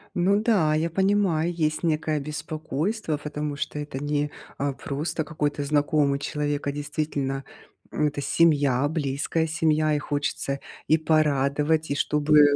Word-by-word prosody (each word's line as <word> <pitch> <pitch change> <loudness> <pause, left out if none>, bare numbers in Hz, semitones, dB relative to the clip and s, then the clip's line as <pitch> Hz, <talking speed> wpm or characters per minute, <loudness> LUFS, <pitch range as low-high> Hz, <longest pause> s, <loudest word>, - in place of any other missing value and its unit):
Ну 195 +4 +3
да, 175 -10 +3
я 160 +2 +1
понимаю, 185 -3 +2
есть 155 -1 0
некое 155 -2 +1
беспокойство, 155 - -3
потому 150 0 -4
что 150 +1 -4
это 145 -2 -5
не, 145 0 0 0.3
э, 140 0 0
просто 155 +4 -3
какой-то 145 -2 -2
знакомый 145 -1 +2
человек, 145 0 -2
а - - +1
действительно, 145 -2 -3 0.5
м, 150 - +2
это 145 0 -4
семья, 145 -3 +3
близкая 155 +1 -1
семья. 155 -1 +2
И 145 - +1
хочется 145 -1 -2 0.3
и 155 - +5
порадовать, 150 0 +2
и 140 - +1
чтобы 150 0 +4
150 Hz, 140 wpm, -25 LUFS, 145-160 Hz, 0.5 s, и